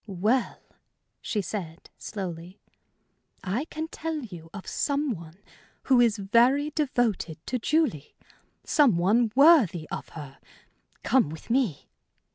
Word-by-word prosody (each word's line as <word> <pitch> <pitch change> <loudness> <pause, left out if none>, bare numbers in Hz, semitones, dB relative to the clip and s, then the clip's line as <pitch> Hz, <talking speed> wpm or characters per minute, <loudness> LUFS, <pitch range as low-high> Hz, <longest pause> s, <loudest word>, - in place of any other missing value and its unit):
"Well," 215 +6 0 0.6
she 210 -3 -2
said, 170 -3 -7
slowly, 180 -2 -7 0.8
"I 210 +10 -2
can 315 0 -5
tell 320 0 -4
you 175 - -10
of 200 0 -9
some 285 -1 -1
one 170 -4 -8 0.5
who 255 -3 +4
is 230 -3 +3
very 240 +9 +3
devoted 245 - -1
to 250 - -2
Julie 265 - 0 0.5
some 275 - +3
one 215 +6 +2
worthy 255 - +5
of - - -6
her. 140 -3 -10 0.6
Come 260 - +3
with 160 +8 -9
me." 235 - 0
220 Hz, 120 wpm, -26 LUFS, 175-270 Hz, 0.8 s, worthy